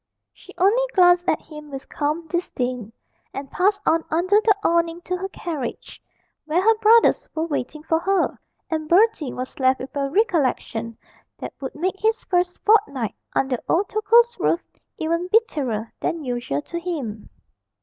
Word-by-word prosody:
She - - -16
only 400 +7 +4
glanced 355 -1 +5
at 310 - 0
him 300 -1 -11
with 270 -1 -8
calm 300 +3 -2
disdain, 250 - -3 0.4
and 275 0 -6
passed 400 +2 +1
on 325 0 +3
under 370 +6 +3
the 430 -2 +4
awning 335 -1 +1
to 365 - -3
her 380 +2 -4
carriage, 300 -11 -6 0.4
where 315 +3 +1
her 445 +4 +4
brothers 450 +2 +4
were 320 +1 0
waiting 300 -1 -4
for 320 0 +1
her, 385 +3 0 0.3
and 310 -1 -2
Bertie 350 - +3
was 255 +2 -7
left 260 0 +3
with 265 +3 -8
a 275 -1 -1
recollection 275 - 0 0.4
that - - -7
would 265 - -5
make 370 +5 -2
his 445 +1 +1
first 360 0 0
fortnight 285 - +2 0.2
under 265 -3 0
old 375 +4 +2
Tokoe's 465 +3 +4
roof 340 - +1 0.3
even 335 +2 -1
bitterer 280 - 0
than 330 -2 -2
usual 240 - -2
to 340 - -5
him. 280 -12 -5
335 Hz, 160 wpm, -22 LUFS, 275-380 Hz, 0.4 s, glanced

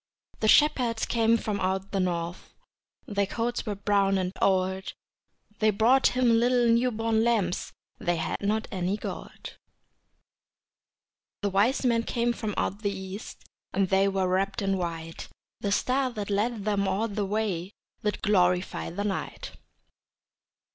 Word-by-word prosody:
The 215 - +1
shepherds 245 -4 +4
came 230 0 +3
from 210 -2 -3
out 190 +1 -1
the 195 - 0
north, 175 -1 -3 0.5
Their 200 -1 -1
coats 240 +2 -2
were 210 - -1
brown 200 -1 +2
and 185 -1 -1
old, 190 0 +1 0.7
They 215 - +4
brought 235 +5 +3
Him 235 -3 +4
little 245 0 +3
new 240 +2 +3
born 225 -1 0
lambs 215 -7 0 0.3
They 175 -1 0
had 165 - -3
not 215 +2 0
any 190 0 -1
gold. - - -8 1.9
The 200 - 0
wise 220 +8 +2
men 235 -2 +3
came 235 +1 0
from 215 -3 -4
out 200 +3 -1
the 205 - 0
east, 195 +1 -7 0.3
And 195 -2 +1
they 195 0 +3
were 190 -1 0
wrapped 195 +3 0
in 195 0 +1
white; 165 -2 -5 0.3
The 200 - -2
star 255 +5 +1
that 210 -2 -4
led 210 +1 0
them 200 -2 +1
all 195 +4 0
the 210 -1 -2
way 195 -3 -2 0.3
Did 210 0 -2
glorify 180 -3 +2
the 190 +5 -4
night. 205 -2 -4
205 Hz, 150 wpm, -27 LUFS, 190-225 Hz, 1.9 s, shepherds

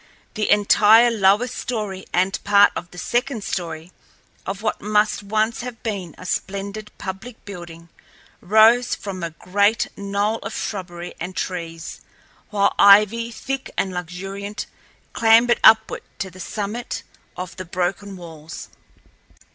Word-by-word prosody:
The 215 - -1
entire 215 +3 +6
lower 205 +1 +3
story 210 -6 -4
and 185 +2 0
part 205 0 +6
of 175 - -5
the 180 - -14
second 240 +3 -1
story 170 -2 -4 0.6
of 195 +2 -4
what 215 - -1
must 210 0 +1
once 215 +3 0
have 245 -1 -8
been 195 -7 -4
a 185 - -11
splendid 200 +3 -4
public 205 +5 -8
building 170 -4 -9 0.5
rose 225 +5 +5
from 195 -2 -7
a 170 - -2
great 200 +6 +1
knoll 200 +2 -1
of 200 - -6
shrubbery 175 -3 -5
and 185 +1 -5
trees, 165 -3 -5 0.5
while 200 -2 +2
ivy, 210 +3 +6
thick 270 +3 -5
and 190 - 0
luxuriant, 195 +4 -5 0.5
clambered 230 +1 +5
upward 220 0 +6 0.2
to 190 -2 -4
the 185 - -14
summit 210 +5 -4 0.3
of 180 -1 -6
the 185 - -6
broken 185 +3 -3
walls. 160 -3 -10
200 Hz, 130 wpm, -22 LUFS, 180-220 Hz, 0.6 s, entire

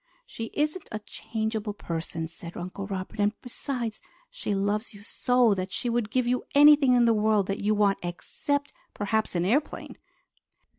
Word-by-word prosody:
"She 225 - -6
isn't 305 +5 -1
a 215 - -2
changeable 220 0 -3
person," 165 -2 -4
said 170 +1 -9
Uncle 185 +3 -5
Robert, 190 0 -5
"and 205 +1 +1
besides 245 -2 -4 0.3
she - - -2
loves 205 +3 -1
you 200 - -12
so 245 0 +3
that 185 -1 -3
she 240 - -2
would 230 -3 0
give 255 +2 +1
you 250 +1 +1
anything 290 -3 +7
in 240 -1 +5
the 230 - +5
world 215 -2 +3
that 195 +1 -2
you 215 +1 +3
want 205 -1 +3
except 285 +11 -3 0.2
perhaps 215 0 0
an 175 0 +1
airplane." 270 +10 -1
215 Hz, 165 wpm, -27 LUFS, 200-245 Hz, 0.3 s, anything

